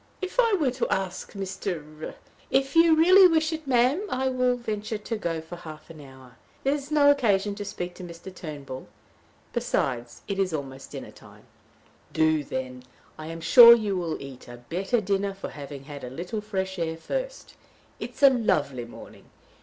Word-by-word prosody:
If 375 +6 -5
I 460 -3 +4
were 305 -10 +2
to 250 0 -2
ask 190 -1 -3
Mr. 175 -6 -5 0.2
" - - -30
"If 270 +2 +1
you 330 -1 +6
really 370 +4 +8
wish 320 -1 +1
it, 315 -2 -6
ma'am, 255 +6 +3
I 265 -2 0
will 255 -1 +1
venture 215 -2 -4
to 220 +2 -4
go 170 -6 -3
for 165 +2 -9
half 155 -2 -11
an 155 -2 -12
hour. 130 -2 -15 0.3
There 275 - +2
is 285 -1 -5
no 290 -1 +5
occasion 210 -7 +2
to 205 0 -6
speak 180 -2 -5
to 185 - -10
Mr. 175 +2 -10
Turnbull. 145 -7 -8 0.7
Besides, 120 -3 -2
it 200 -2 -3
is 185 -3 +1
almost 135 -2 -7
dinner - - -7
time." - - -17 0.7
"Do, 155 -1 +2
then. 130 -2 -5 0.4
I 155 - -7
am 165 0 -7
sure 235 +6 +10
you 210 -4 -1
will 170 -3 -2
eat 135 -2 -10
a 120 0 -10
better 195 +7 0
dinner 200 0 -1
for 195 - -6
having 140 -1 -9
had 145 0 -9
a 125 - -5
little 180 - -5
fresh 190 -3 -3
air 160 -1 -2
first. - - -5 0.5
It - - -7
is - - -8
a 275 - +9
lovely 145 - 0
morning. 120 - -13
195 Hz, 185 wpm, -26 LUFS, 155-255 Hz, 0.7 s, sure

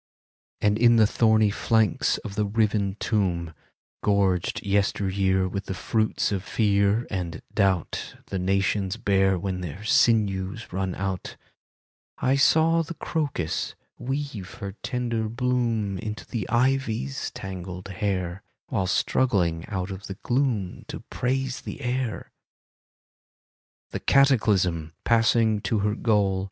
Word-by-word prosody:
And 105 +1 +2
in 120 0 +6
the 110 -1 +6
thorny 110 -1 +3
flanks 110 -2 +2
of 100 - -5
the 105 0 0
riven 105 -2 +1
tomb, 85 -6 0 0.5
Gorged 100 -4 +1
yesteryear 95 -1 +1
with 100 +2 -4
the 95 - -4
fruits 110 +2 0
of 95 -2 -1
fear 100 +1 +2
and 90 -4 -4
doubt 95 -4 0
The 95 - -3
nations 95 +1 0
bear 95 -4 +2
when 90 0 -3
their 90 +4 -6
sinews 110 -5 +2
run 95 -1 -2
out, 95 -1 -4 0.8
I 130 - +2
saw 160 +4 +4
the 165 +1 -6
crocus 145 - -2 0.2
weave 130 -7 -4
her 100 -4 -5
tender 120 -3 -2
bloom 115 -5 0
Into 110 -1 -5
the 110 -6 -4
ivy's 120 - 0
tangled 95 0 -7
hair, 95 -2 -2 0.3
While 95 -2 0
struggling 90 -6 +1
out 95 -1 -3
of 95 +1 -7
the 95 - -7
gloom 120 -8 0
To - - -6
praise 135 +1 -1
the - - -7
air. 125 -4 -3 1.6
The - - -3
Cataclysm, 100 - +3
passing 115 -2 +3
to 115 - 0
her 105 +1 +1
goal. 105 -4 +2
100 Hz, 125 wpm, -25 LUFS, 95-115 Hz, 1.6 s, in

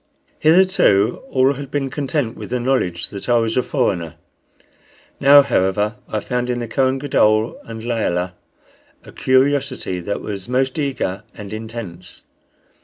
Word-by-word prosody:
Hitherto 155 - +4
all 130 - +3
had 140 0 -7
been 140 -2 -2
content 140 -4 -2
with - - -8
the 125 +1 -1
knowledge 120 -10 0
that 100 +4 -7
I 120 - +5
was 115 -1 0
a 125 - +3
foreigner. 90 - -1 1.0
Now, 140 +1 +8
however, 105 -3 +1 0.2
I 110 - -1
found 125 +2 -2
in 125 - 0
the 120 -1 -4
Kohen 130 +3 +1
Gadol 110 -5 +2
and 110 -1 -8
Layelah 95 -7 -1 0.7
a - - -13
curiosity 130 -6 +1
that 100 +4 -3
was 100 0 -6
most 130 +3 0
eager 130 -9 -2
and 105 -1 -8
intense. 110 -6 -8
120 Hz, 145 wpm, -20 LUFS, 105-135 Hz, 1.0 s, Now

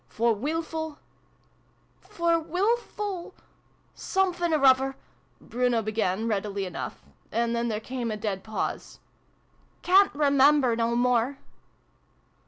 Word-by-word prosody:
For 230 - +1
wilful 315 +5 -3 1.0
"For 335 -1 0
wifful 395 +1 -2 0.6
siimfinoruvver 310 -8 +2 0.3
" - - -38
Bruno 245 -1 0
be 215 - -3
gan, 215 0 -1
readily 200 -2 -2
enough; 180 - -6 0.3
and 235 0 0
then 235 0 -1
there 215 -2 -2
came 245 +1 -4
a 215 - -3
dead 205 -3 -3
pause. 215 -1 -4 0.4
" - - -37
Ca'n't 380 -1 +5
remember 280 -3 +4
no 230 0 0
more 250 +2 +1
255 Hz, 110 wpm, -26 LUFS, 225-320 Hz, 1.0 s, Ca'n't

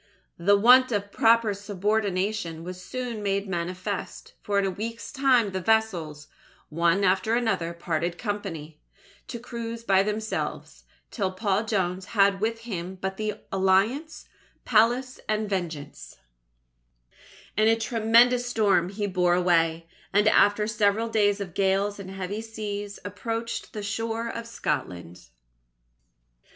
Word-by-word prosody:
The 200 +4 +4
want 250 +4 +6
of 205 -2 -2
proper 225 -2 +4
subordination 200 -3 -2
was 180 +1 -7
soon 240 +2 -5
made 200 0 -1
manifest, 185 +2 -4
for 205 -1 -1
in 200 - +2
a 190 - 0
week's 230 +5 -6
time 255 -6 +3
the 190 0 -3
vessels, 175 -9 0 0.4
one 170 +5 +2
after 190 +4 +2
another, 220 -8 0
parted 170 0 -2
company, 170 -8 -5 0.5
to 240 - -5
cruise 230 -1 -6
by 195 -4 +4
themselves, 215 +2 -4 0.3
till 195 -5 -1
Paul 200 +2 0
Jones 190 -3 -1
had 195 -1 +4
with 225 +1 -1
him 190 -5 -5
but 190 +1 -4
the 215 -1 -2 0.2
Alliance, 215 +12 +1 0.4
Pallas, 245 +3 +2
and 215 0 0
Vengeance. 170 -7 -5 1.4
In 215 +1 +3
a 225 - +5
tremendous 235 +2 +3
storm 205 -7 +2
he 205 +1 -3
bore 180 -3 +2
away, 165 -2 +2 0.2
and 205 +2 +3
after 210 0 +4
several 215 +1 +1
days 205 -2 +2
of 190 -4 -6
gales 195 +1 +1
and 190 -1 -8
heavy 195 +2 -4
seas, 205 -2 -6
approached 225 +3 -4
the 210 - -5
shore 225 +3 -2
of 230 0 -6
Scotland. 90 - -4
205 Hz, 130 wpm, -26 LUFS, 185-225 Hz, 1.4 s, want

